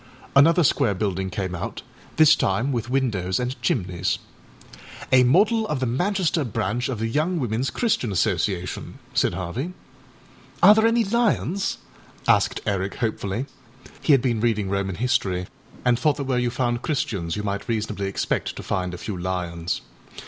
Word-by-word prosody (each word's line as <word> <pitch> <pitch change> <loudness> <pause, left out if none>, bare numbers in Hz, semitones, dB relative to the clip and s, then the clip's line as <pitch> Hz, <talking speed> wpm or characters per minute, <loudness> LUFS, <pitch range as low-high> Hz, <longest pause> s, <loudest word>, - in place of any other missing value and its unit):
Another 165 +5 +6
square 110 -7 +2
building 95 -1 -2
came 95 -1 -3
out, 90 - -5 0.3
this 155 -1 +7
time 115 +8 0
with 120 -2 -2
windows 110 -9 0
and 125 +1 -3
chimneys. 90 -5 0 1.0
âA 130 -1 +7
model 215 - +3
of 150 - -2
the 130 - 0
Manchester 175 - 0
branch 120 +1 -2
of 130 - -2
the 115 +1 -1
Young 155 +9 0
Womenâs 120 0 -1
Christian 225 - 0
Association,â 90 -1 -1 0.2
said - - +2
Harvey. 105 - -4 0.9
âAre 200 +3 +10
there 220 +1 +4
any 230 0 +3
lions?â 205 -3 0 0.5
asked - - +3
Eric 100 -1 -1
hopefully. 110 +1 -2 0.6
He 155 - +4
had 135 -3 +4
been 120 -4 0
reading 105 -4 0
Roman 100 -1 -1
history 95 -5 0 0.4
and 125 -1 +3
thought 150 -2 +2
that 140 - -2
where 130 -2 0
you 125 0 +1
found 120 -1 -1
Christians 115 - -2
you 105 - -3
might 100 -1 -3
reasonably 105 -3 -2
expect 95 - -2
to - - -7
find 90 -1 -2
a - - -8
few 100 +3 -5
lions. 90 -2 -3
120 Hz, 160 wpm, -24 LUFS, 95-140 Hz, 1.0 s, âAre